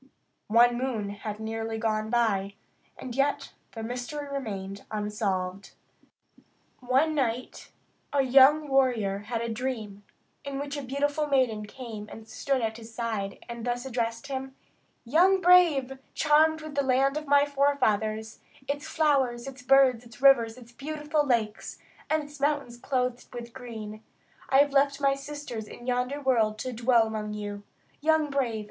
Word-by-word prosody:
One 240 +2 +4
moon 235 -6 -2
had 210 +1 -6
nearly 225 0 -3
gone 215 -1 -1
by, 205 -4 +1 0.4
and 245 -2 -7
yet 280 +1 0 0.2
the 225 - -6
mystery 250 +5 -5
remained 200 -8 -5
unsolved. 200 -3 -3 1.1
One 265 +5 +2
night 255 -4 -2 0.4
a 280 -1 +2
young 275 +4 +6
warrior 245 -8 +2
had 225 +3 -4
a 235 - -2
dream, 225 -4 -4 0.4
in 280 -1 -5
which 285 +1 -4
a 285 - -3
beautiful 290 +3 -1
maiden 245 -7 +1
came 220 -3 -8
and 225 0 -10
stood 270 +1 -1
at 220 0 -2
his 230 0 -11
side, 225 -4 -4
and 235 -1 -7
thus 245 +1 -2
addressed 235 -1 -2
him: 265 -1 -5 0.5
"Young 360 +10 +4
brave! 330 -8 +4 0.2
charmed 315 +1 +4
with 310 -1 -8
the 280 0 +1
land 270 +1 +2
of 305 -1 -4
my 285 0 +5
forefathers, 220 -7 0 0.3
its 290 +2 -3
flowers, 275 -7 +1
its 265 -2 -8
birds, 260 -2 +4
its 235 -1 -15
rivers, 250 -4 +5
its 240 -2 -14
beautiful 300 +3 -2
lakes, 225 -6 -1 0.3
and 310 0 +1
its 290 0 -12
mountains 285 -4 0
clothed 250 -1 -2
with 235 -1 -7
green, 220 -4 -8 0.5
I 265 - +4
have 285 -1 +1
left 280 0 +3
my 275 -1 +3
sisters 275 -5 -6
in 240 - -11
yonder 250 +3 -1
world 230 -6 +2
to 255 +3 -4
dwell 235 0 +3
among 215 -1 -4
you. 205 -1 -5 0.4
Young 310 -1 +2
brave! 250 -6 0
250 Hz, 155 wpm, -27 LUFS, 225-280 Hz, 1.1 s, young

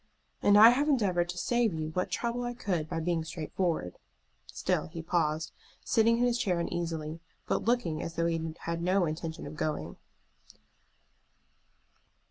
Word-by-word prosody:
"And 205 0 +5
I 220 +2 +10
have 285 +5 +1
endeavored 185 -10 +2
to 180 - -5
save 235 -1 +1
you 155 -1 -3
what 180 +3 -1
trouble 235 +1 -2
I 245 0 -3
could 175 -9 -2
by - - -2
being 165 0 0
straightforward." 160 - -3 0.5
Still - - -1
he 165 0 -7
paused, 160 -2 0 0.3
sitting 230 +1 +3
in 240 - +1
his 245 -1 +2
chair 180 -6 +1
uneasily, 165 -2 -3 0.3
but - - -1
looking 230 -10 +1
as 165 - -5
though 165 - +1
he 165 -1 0 0.2
had 170 0 -3
no 185 +1 +2
intention 160 +1 -4
of 145 +2 -7
going. 155 0 -3
175 Hz, 155 wpm, -30 LUFS, 160-220 Hz, 0.5 s, I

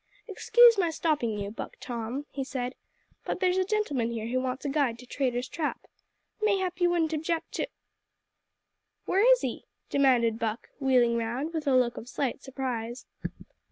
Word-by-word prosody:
"Excuse 465 +2 +6
my 350 -3 +3
stopping 295 -9 0
you, 200 0 -4
Buck 225 - -7
Tom," 240 +4 -4
he 275 - -3
said, 255 -1 -3 0.5
"but - - -3
there's 370 0 +2
a - - +3
gentleman 365 - 0
here 230 -2 -4
who 255 +1 +1
wants 260 +2 -3
a - - 0
guide 275 -5 +1
to 250 - -12
Traitor's 250 -1 -1
Trap. 315 +1 -3 0.6
Mayhap 380 -4 +1
you 350 - +5
wouldn't 330 -2 +1
object 320 +2 -2
to - - -2 0.7
" - - -54
"Where 425 +7 +4
is - - +5
he?" - - -4 0.3
demanded 245 -5 +3
Buck, 225 0 -3
wheeling 250 -4 +3
round, 245 +8 -2
with 315 -2 -3
a 270 - +4
look 245 -2 +2
of 235 - -8
slight 275 -1 -2
surprise. 250 -3 -4
270 Hz, 170 wpm, -28 LUFS, 240-335 Hz, 0.7 s, Excuse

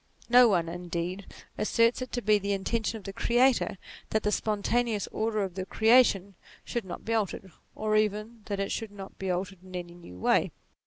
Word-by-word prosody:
No 245 0 +8
one, 175 -6 +2
indeed, 175 +2 -4 0.3
asserts 230 +3 +2
it 255 - -5
to 245 - -2
be 210 0 +4
the 200 0 -1
intention 220 +3 -1
of 210 - -12
the 195 - -7
Creator 240 0 +2 0.3
that 220 - 0
the 210 - +1
spontaneous 215 +1 0
order 215 -1 0
of 190 -2 -4
the 190 +1 -4
creation 220 -2 +4 0.3
should 235 -4 -3
not 175 - -8
be 230 - -1
altered, 200 -3 -2 0.2
or 215 0 0
even 215 +2 0
that 200 -1 -3
it 195 - -1
should 225 - -3
not 195 -1 -11
be 190 - -3
altered 185 +1 -2
in 185 -1 -11
any 175 -1 -5
new 170 - -12
way. - - +2
205 Hz, 195 wpm, -28 LUFS, 190-225 Hz, 0.3 s, No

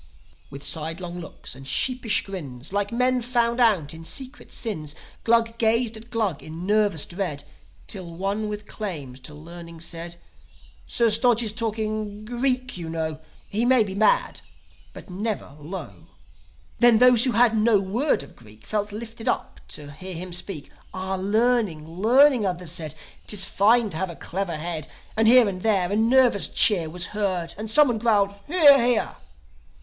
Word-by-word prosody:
With 140 +1 -9
sidelong 165 +4 -1
looks 165 - -9
and 135 +1 -11
sheepish 245 - +1
grins, 150 -7 -7
Like 205 0 -1
men 250 +1 +1
found 235 0 0
out 195 -12 +2
in 165 0 -10
secret 260 - -5
sins, 155 -10 -4 0.3
Glug 230 0 +2
gazed 230 0 +2
at 225 +2 -10
Glug 215 - -1
in 160 +3 -8
nervous 205 -6 +1
dread; 170 -6 -4 0.4
Till 185 -5 -6
one 200 +4 -2
with 210 0 -6
claims 150 -13 -6
to 150 +3 -11
learning 170 +2 -11
said, 170 +1 -6 0.7
"Sir 235 -2 +1
Stodge 235 +1 +3
is 215 -2 -1
talking 215 -1 -3
Greek, 255 0 -1
you 165 -1 -6
know. 160 -1 -3 0.3
He 215 +3 -1
may 250 -1 +4
be 195 -2 -6
bad, 215 +2 +2 0.5
but - - -12
never 200 - -4
low." 170 +6 -9 0.7
Then 240 -2 +6
those 250 0 +6
who 255 - 0
had 235 -1 +4
no 215 -1 +3
word 205 - 0
of 140 - -15
Greek 110 -1 -17
Felt 210 -1 -2
lifted 225 +2 -8
up - - -2
to 145 -1 -6
hear 185 +5 -8
him 180 +1 -7
speak. 175 -4 -3 0.2
"Ah, 190 +1 -3
learning, 205 -4 +1
learning," 240 - +4
others 180 -4 -2
said. 160 -3 -3 0.3
'Tis 195 -3 +3
fine 220 +3 +3
to 155 - -4
have 190 +1 -2
a 170 - -8
clever 175 -2 -4
head." 155 -2 -4 0.3
And 220 0 +2
here 245 -1 +7
and 185 -2 -4
there 195 -4 +1
a - - 0
nervous 235 -1 +4
cheer 175 -7 +4
Was 175 +2 -3
heard, 185 -5 -2
and 215 +2 -5
someone 245 -2 +5
growled, 205 -3 +2
"Hear, 290 -6 +6
hear." 240 -2 +1
205 Hz, 165 wpm, -24 LUFS, 170-230 Hz, 0.7 s, here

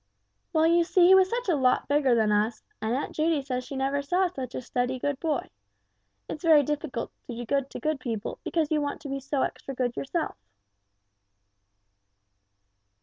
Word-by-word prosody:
"Well, 320 -2 +3
you 340 +1 +4
see 355 +1 +4
he 370 - +8
was 380 -1 +6
such 480 +1 -2
a 360 - +3
lot 255 -3 +2
bigger 285 -3 +3
than 220 -2 +2
us, 215 +2 +1 0.2
and 220 +2 0
Aunt 275 - -3
Judy 310 -2 +1
says 255 -2 -3
she 275 - -8
never 270 +1 0
saw 355 +7 +1
such 265 -8 -5
a - - -3
steady 250 +2 -1
good 285 +1 -2
boy; 310 -5 -2 0.8
it's 305 - -6
very 315 -3 +6
difficult 290 -4 -3 0.2
to 240 - -5
do 240 +1 -5
good 275 +2 0
to - - -7
good 310 -2 -1
people, 230 -5 -4
because 320 -3 -1
you 305 -1 +2
want 285 0 -3
to 290 - -7
be 275 0 -2
so 275 0 -1
extra 270 - -4
good 245 -1 -1
yourself." 315 +4 -2
280 Hz, 190 wpm, -27 LUFS, 255-315 Hz, 0.8 s, he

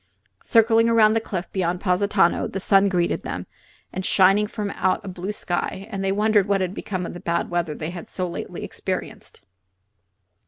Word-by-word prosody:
Circling 225 0 +4
around 220 -2 +5
the 225 - +1
cliff 190 -4 -5
beyond 180 -2 -1
Positano 190 -1 +2
the 195 - -4
sun 195 +1 +4
greeted 175 -2 0
them, - - -5 0.6
shining 195 +2 +4
from 205 -2 -4
out 185 +2 0
a - - -7
blue 185 +2 -4
sky, 190 -1 -3
and 195 -1 -3
they 195 - +1
wondered 210 0 +3
what 200 -1 +2
had 185 -1 -2
become 185 -3 -4
of - - -6
the 175 - -8
bad 170 -1 -2
weather 170 -3 -1
they 155 +2 -5
had 175 -2 -8
so 185 - -2
lately 170 - -6
experienced. - - -6
195 Hz, 180 wpm, -23 LUFS, 180-210 Hz, 0.6 s, around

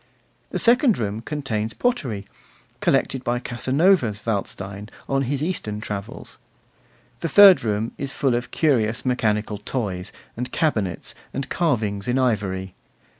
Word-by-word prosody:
The - - -3
second 245 -1 +4
room 105 0 -2
contains 115 -6 -3
pottery, 125 - -1 0.5
collected 130 -1 +1
by 120 0 0
Casanova's 130 - +1
Waldstein 100 -1 -4 0.2
on 135 0 +1
his 140 +2 -1
Eastern 110 - -2
travels. 105 -1 -7 0.8
The 165 - -2
third 195 +3 +8
room 110 +1 -1
is 140 -1 -2
full 135 -3 +1
of 120 +1 -2
curious 120 -6 +1
mechanical 110 -4 0
toys, 100 -5 -3 0.2
and 125 +2 -4
cabinets, 105 - -1 0.2
and 135 - -3
carvings 110 - 0
in 125 +1 +1
ivory. 95 -7 0
120 Hz, 125 wpm, -23 LUFS, 105-140 Hz, 0.8 s, third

